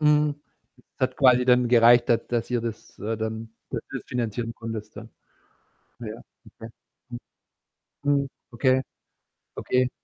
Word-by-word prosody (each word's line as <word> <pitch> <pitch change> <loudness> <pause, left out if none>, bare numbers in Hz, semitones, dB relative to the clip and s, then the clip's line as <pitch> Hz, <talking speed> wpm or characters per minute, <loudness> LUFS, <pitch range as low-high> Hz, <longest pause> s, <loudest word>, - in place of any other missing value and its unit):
Mhm. 150 -1 +3 0.6
Es - - -35
hat 130 0 0
quasi 125 -2 +5
dann 125 -1 +4
gereicht, 120 0 +6
da 120 - +5
dass 120 0 -3
ihr 120 -1 +1
das, 115 -1 -7
äh, 110 +2 -2
dann 110 +1 -4 0.2
dass - - -3
du's - - -5
finanzieren 115 -1 -3
konntest, 110 -2 -7
ja. 115 - -9 0.9
Ja. 110 -1 -7 0.4
Okay. 115 - -8 0.4
Mhm. 120 - -6 1.0
Mhm. 140 - -5 0.2
Okay. 130 +2 +2 0.7
Okay. 125 0 +1
120 Hz, 140 wpm, -25 LUFS, 115-125 Hz, 1.0 s, gereicht